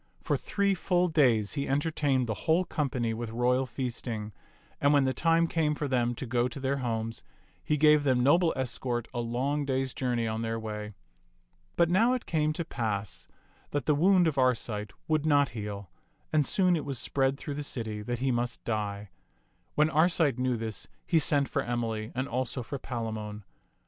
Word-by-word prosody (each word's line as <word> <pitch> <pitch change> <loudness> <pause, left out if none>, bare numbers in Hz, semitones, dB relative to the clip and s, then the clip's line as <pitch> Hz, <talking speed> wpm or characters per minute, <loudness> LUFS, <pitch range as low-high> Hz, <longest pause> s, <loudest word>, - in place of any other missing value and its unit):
For - - 0
three 200 -1 0
full 180 -1 +1
days 120 -10 +3
he 140 -2 -2
en 135 +2 +2
tertained 145 -4 0
the 110 - -2 0.2
whole 175 +3 +4
company 125 -8 -1
with 115 0 -4
royal 125 +3 +1
feasting; 120 -4 -4 0.5
and 145 +1 +4
when 145 -2 +5
the 130 0 +1
time 165 +5 +3
came 155 -2 +1
for 145 - -2
them 120 -2 +1
to 130 - -5
go 120 0 +1
to 125 - -7
their 135 +1 0
homes, 115 -3 -3 0.4
he 150 - +1
gave 150 0 +5
them 130 -3 +2
noble 165 +5 +4
escort 125 -2 -2
a 120 - -2
long 130 +5 -1
day's 135 -1 -1
journey 120 -3 -1
on 110 0 -2
their 115 0 -2
way. 105 -1 -6 0.8
But 170 - +4
now 215 +9 +3
it 255 - -2
came 155 -2 +1
to 170 +1 -3
pass 105 - -3 0.4
that 145 - -2
the 150 - +3
wound 180 +4 +4
of 150 -4 0
Arcite 115 -5 0 0.2
would 155 -1 +1
not 145 -2 +4
heal, 105 -4 -6 0.4
and 150 -3 +3
soon 185 -2 +3
it 155 - -2
was 140 -2 -4
spread 135 +2 0
through 145 - -5
the 145 - -4
city 110 -7 -4
that 120 +3 -3
he 130 +2 0
must 120 0 -2
die. 105 -3 -3 0.6
When 155 +1 +3
Arcite 155 -4 +3
knew 125 -1 +1
this, 110 -1 -5 0.2
he 165 - +3
sent 140 -2 +3
for - - -1
Emily 115 -2 -2
and 130 +2 -1
also 125 +1 -2
for 140 +4 -5
Palamon. 110 -4 -5
130 Hz, 190 wpm, -29 LUFS, 115-150 Hz, 0.8 s, when